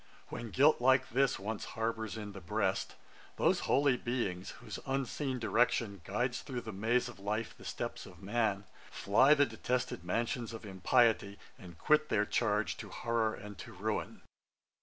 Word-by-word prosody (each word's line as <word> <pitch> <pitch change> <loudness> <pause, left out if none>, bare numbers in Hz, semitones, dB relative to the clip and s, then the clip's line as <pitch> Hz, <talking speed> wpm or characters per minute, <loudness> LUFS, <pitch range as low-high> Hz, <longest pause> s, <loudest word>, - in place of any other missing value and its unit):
When 120 - -6
guilt 140 +4 +4
like 130 +1 +4
this 135 +2 +2
once 105 +2 -4
harbours 115 -1 -2
in 105 -2 -6
the 95 -1 -9
breast, 85 - -1 0.4
Those - - +3
holy 140 -2 +4
beings, 115 -8 -2
whose - - -7
unseen 135 0 -1
direction 115 -4 +1
Guides 120 +7 -1
through 125 -3 -5
the 110 - -6
maze 115 +5 +1
of 120 -4 -10
life 105 +3 -3
the - - -15
steps - - -5
of - - -14
man, 105 -1 0 0.3
Fly 130 +9 +4
the 145 -1 +5
detested 125 -3 -2
mansions 115 +5 -2
of 110 -1 -8
impiety, 100 +1 +2 0.2
And 85 -3 -12
quit 150 - +3
their 105 - +2
charge 105 -9 0
to - - -8
horrour 115 -2 0
and 105 0 -10
to - - -9
ruin.' - - -3
115 Hz, 160 wpm, -33 LUFS, 105-125 Hz, 0.4 s, the